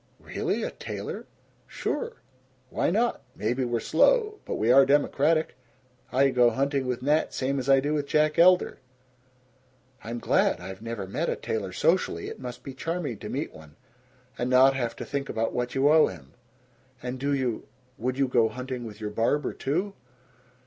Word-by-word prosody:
"Really? - - -2
A - - -2
tailor?" - - -6 0.4
"Sure. 470 -1 -3 0.6
Why - - +1
not? 225 - +1
Maybe 120 +5 -1
we're 120 -1 -1
slow, 435 - +3
but - - -3
we 110 +3 +2
are 135 +2 +8
democratic. 145 +3 +2 0.6
I 135 +2 +3
go 125 -1 +5
hunting 140 +1 -1
with 125 0 -2
Nat 150 +3 +1
same 140 +1 -1
as 130 +1 -4
I 135 0 +7
do 145 +3 -1
with 145 -2 -1
Jack 150 +1 +2
Elder." 180 +1 +5 1.2
"I'm 115 +2 -5
glad. - - +2
I've 95 +1 -8
never 115 -3 -5
met 95 - -2
a - - 0
tailor 100 -4 -3
socially. 165 - +1
It - - -9
must 125 -1 -8
be 135 - -7
charming 150 - -3
to - - -7
meet - - -3
one 75 -1 -14 0.6
and 120 - -1
not 130 +1 +6
have 120 -3 -2
to - - -6
think 140 -1 -3
about 115 0 -1
what 125 +1 -2
you 135 +1 +3
owe 155 +1 +6
him. 75 -5 -10 0.7
And 125 +1 -4
do 140 +2 -1
you 130 -5 -1 0.3
Would 130 +3 -2
you 135 -1 +2
go 120 -3 +3
hunting 125 0 -5
with 105 -1 -9
your 105 -1 -4
barber, 115 +7 0
too?" 180 +9 -2
130 Hz, 175 wpm, -27 LUFS, 120-145 Hz, 1.2 s, are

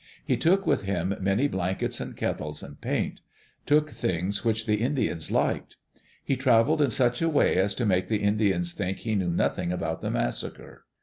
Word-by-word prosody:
He - - +2
took 195 +4 +2
with - - +2
him 95 -1 -1
many 100 +8 +2
blankets 95 -6 -2
and - - -7
kettles 75 0 -3
and 70 0 -11
paint; - - -2 0.5
took 150 +1 +3
things 95 +4 -2
which 110 -1 0
the 105 -1 +1
In 135 +5 0
dians 85 - -1
liked. - - 0 0.5
He 135 - 0
traveled 130 +4 +3
in 145 - +4
such 120 +3 +1
a 165 - +2
way 150 - +3
as 95 +1 +2
to 120 - -1
make 90 -3 +2
the 105 0 -1
Indians 100 -4 +1
think 95 -1 -2
he 110 - -3
knew 95 -4 0
nothing 85 0 0
about 80 -2 -3
the - - -2
massacre. - - -4
100 Hz, 190 wpm, -27 LUFS, 90-125 Hz, 0.5 s, in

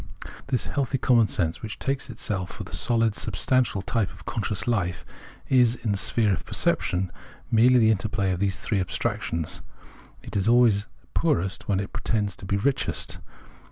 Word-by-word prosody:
This 130 -4 0
"healthy 135 -1 -1
common 120 -4 +4
sense," 85 -3 -1
which 110 0 -6
takes 135 0 -2
itself 100 -5 -3
for - - -7
the - - -12
sohd 115 -2 +1
substantial 110 +1 0
type 115 -5 0
of - - -15
conscious 105 -3 -2
life, 95 -8 -1 0.4
is, 125 -3 +4
in 115 -3 -2
the 100 - 0
sphere 110 -2 +2
of 85 - -3
perception, 90 0 0 0.4
merely 125 +3 +6
the 110 -2 +5
interplay 100 -2 0
of 90 - -2
these 100 -1 -1
abstractions; 90 -4 -1 0.6
it - - -9
is 100 0 +1
always 115 -4 +4 0.3
poorest 115 - 0
where 100 -2 +1
it 100 - -5
pretends 105 -4 -1
to 95 - -8
be 100 - +1
richest. 135 +6 0
110 Hz, 160 wpm, -25 LUFS, 95-120 Hz, 0.6 s, merely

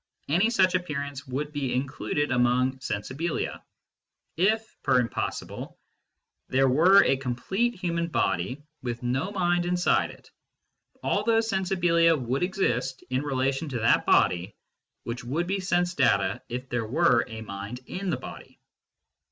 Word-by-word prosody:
Any 180 +10 +3
such 190 -6 +3
appearance 140 -6 -3
would 145 +4 -3
be 140 -4 -2
included 140 +2 -2
among 125 +1 +2
sensibilia. 135 +7 -3 0.7
If 220 +6 +1
$er 130 -1 +5
impossibile 120 -2 -4 0.7
there 135 +1 +3
were 175 +10 +6
a 135 - +2
complete 190 - -1
human 170 -2 -2
body 95 - -1 0.2
with 120 -1 -4
no 130 +9 -1
mind 175 -3 +1
in 180 0 +1
side 175 - +2
it, - - -15 0.7
all 205 - +1
those 225 0 +2
sensibilia 175 -4 +3
would 125 +2 -2
exist, 135 - -1
in 130 +1 +1
relation 135 +1 -1
to 125 -3 -3
that 115 - +3
body, 90 +3 +3 0.5
which 120 +1 -5
would 150 +8 -1
be 195 +3 -1
sense 175 -1 0
data 100 - +2
if 125 +2 -5
there 120 -2 -2
were 130 -2 +3
a 110 -2 -7
mind 100 +4 -7
in 190 +6 -4
the 170 - 0
body. - - -10
140 Hz, 145 wpm, -27 LUFS, 125-175 Hz, 0.7 s, were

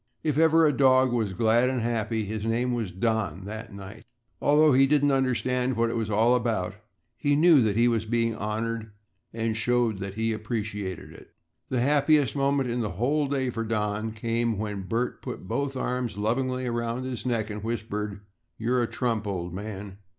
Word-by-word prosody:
If 150 -3 0
ever 160 0 +5
a 150 - +3
dog 130 -2 +4
was 110 -5 0
glad 115 +5 +3
and 130 -1 -1
happy, 110 -1 -1
his 105 +1 -4
name 120 +3 0
was 115 -5 -2
Don 95 -3 -1
that 110 +2 -7
night. 100 +1 -10 0.4
Although 150 +1 +5
he 135 +1 +5
didn't 145 0 +3
understand 125 -1 0
what 115 0 +2
it - - -3
was 110 -2 -2
all 115 +4 +4
about, 115 -6 -1 0.4
he 145 +5 +1
knew 155 -2 +6
that 110 -2 +1
he 120 +1 +5
was 115 -2 +1
being 115 0 0
honored 110 +1 -3 0.4
and 115 -1 -2
showed 115 -2 +1
that 100 0 -5
he 110 0 0
appreciated 105 -4 -4
it. - - -16 0.3
The 125 -2 0
happiest 145 0 +3
moment 140 -1 +1
in 120 - -1
the 105 -6 -3
whole 145 +6 +1
day 135 -2 -1
for 115 -1 -3
Don 110 0 -1
came 115 0 -1
when 100 -2 -4
Bert 120 +4 -2
put - - -7
both 140 +4 -2
arms 125 -4 -2
lovingly 130 +4 -1
around 120 +1 -2
his 125 -4 -5
neck 115 -3 -1
and 105 0 -6
whispered, 105 -3 -4 0.4
"You're 120 +2 +1
a 120 - 0
trump, 115 -4 -2
old 90 -3 -3
man." 100 0 -7
115 Hz, 185 wpm, -26 LUFS, 110-125 Hz, 0.4 s, knew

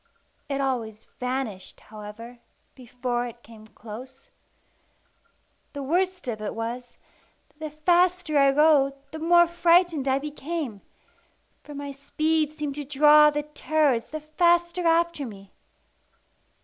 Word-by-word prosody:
It 275 -1 -2
always 230 -5 -3
vanished, 250 -6 -4
however, 220 +3 -11 0.3
before 245 -1 -3
it 240 0 -12
came 220 -1 -15
close. 245 +5 -12 1.4
The 285 -1 -5
worst 360 +3 -1
of 220 -3 -4
it 215 - -4
was, 240 +2 -6 0.5
that 300 - -34
the 310 0 -5
faster 350 +1 +1
I 275 0 +5
rode, 285 -1 +4 0.2
the 315 - -7
more 345 +2 +5
frightened 340 -3 +2
I 265 0 +3
became; 290 - -5 0.8
for 295 - -10
my 285 0 -6
speed 305 +2 -1
seemed 295 -2 -3
to - - -5
draw 300 +2 +6
the 295 0 -2
terrors 300 -4 0
the 310 0 -6
faster 345 +3 +1
after 335 -2 +2
me. 195 -3 -12
285 Hz, 125 wpm, -25 LUFS, 245-315 Hz, 1.4 s, draw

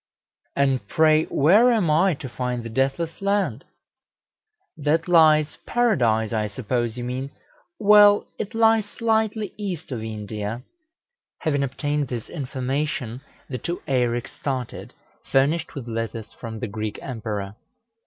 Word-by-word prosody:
"And 135 -6 +1
pray 155 +3 +4
where 205 - +5
am 205 -9 +2
I 170 +3 +3
to 140 - -7
find 125 -1 -3
the 115 - -6
Deathless 135 - -1
Land?" 195 - 0 1.1
"That 155 +3 0
lies 155 -3 +4
Paradise, 120 - +2
I 110 -1 0
suppose, 120 +2 -2
you 120 - -4
mean 130 +2 -4 0.5
well, 205 -1 +7
it 220 +2 -4
lies 225 -1 +4
slightly 220 -1 -1
east 190 -9 -5
of 120 -4 -3
India." 105 +1 -5 0.8
Having 145 -3 +1
obtained 145 +2 -1
this 120 -3 -5
information, 135 -3 -3 0.3
the 125 -2 -5
two 170 +9 -4
Eireks 120 -3 0
started, 130 -4 -4 0.4
furnished 150 +5 +2
with 130 -4 -6
letters 115 -1 -4
from 110 -1 -8
the 120 - -2
Greek 110 0 -4
Emperor. 105 -5 -5
135 Hz, 130 wpm, -24 LUFS, 120-170 Hz, 1.1 s, well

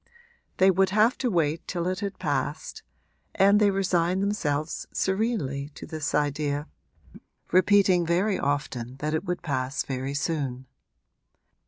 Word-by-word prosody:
They 190 +1 +6
would 190 +1 +2
have 215 +5 +3
to 255 - 0
wait 165 -4 0
till 175 -2 -2
it 185 0 -1
had 200 -1 -4
passed, - - -3 0.5
and 200 +2 +5
they 210 -1 +4
resigned 190 -1 +1
themselves 155 -7 -2
serenely 190 - -1
to - - -8
this 155 -3 -3
idea, 145 0 -1 0.8
repeating 185 0 +4
very 185 +5 +1
often 135 -4 -2
that 150 +2 -2
it 160 +5 -1
would 180 -1 -3
pass 130 -3 -2
very 135 +1 -4
soon. 140 -4 -2
170 Hz, 135 wpm, -26 LUFS, 145-195 Hz, 0.8 s, They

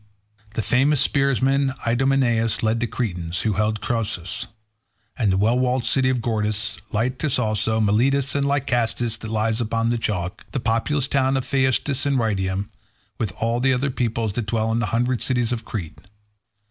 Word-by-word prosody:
The 110 - -1
famous 135 +5 +3
spearsman 135 0 +2
Idomeneus 120 -2 +1
led 110 +1 +2
the 120 - 0
Cretans, 90 -8 -3
who 110 - +1
held 105 +2 0
Cnossus, 110 -2 -2 0.7
and 110 -6 +1
the 95 - +2
well 115 +5 +3
walled 125 -1 +1
city 130 +2 +3
of 125 -2 0
Gortys; 110 -1 -1
Lyctus 125 +6 0
also, 110 -1 0
Miletus 130 +6 +2
and 140 0 +1
Lycastus 120 -4 0
that 110 - -7
lies 110 +1 0
upon 115 +1 0
the 120 - 0
chalk; 90 -5 -3
the 135 - 0
populous 120 +5 0
towns 135 -1 +2
of 130 - -2
Phaestus 135 +1 +1
and 140 -1 +2
Rhytium, 100 -4 -1 0.5
with 110 - 0
the 120 +7 +1
other 135 +2 0
peoples 115 -4 -1
that 115 -1 -3
dwelt 110 +1 0
in 115 - +1
the 115 - 0
hundred 120 +3 0
cities 120 -2 0
of 115 -2 -3
Crete. 85 -7 -6
115 Hz, 165 wpm, -23 LUFS, 110-130 Hz, 0.7 s, famous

